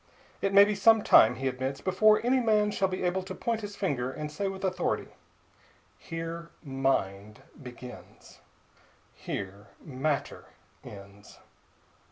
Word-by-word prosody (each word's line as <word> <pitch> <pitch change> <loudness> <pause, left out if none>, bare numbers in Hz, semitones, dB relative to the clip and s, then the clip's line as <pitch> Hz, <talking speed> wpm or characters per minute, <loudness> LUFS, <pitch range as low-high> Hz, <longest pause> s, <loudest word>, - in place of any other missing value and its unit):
It 195 - 0
may 200 +1 +8
be 210 - -1
some 220 +2 +4
time, 110 - +6
he 135 +3 -3
admits, 130 +1 -3
before 215 +4 +3
any 260 +2 +3
man 215 -3 +2
shall 195 - +1
be 185 0 -4
able 180 +1 0
to 185 0 -8
point 230 -1 -2
his 205 -1 -7
finger 130 -11 -2
and 150 +2 -6
say 200 +6 -3
with 195 0 -6
authority, 185 -1 -1 0.9
"Here 165 0 -6
mind 120 - -2 0.2
begins; 125 -1 -12 0.7
here 100 +2 -7 0.2
matter 140 0 -3 0.4
ends." 100 0 -13
165 Hz, 135 wpm, -28 LUFS, 130-200 Hz, 0.9 s, may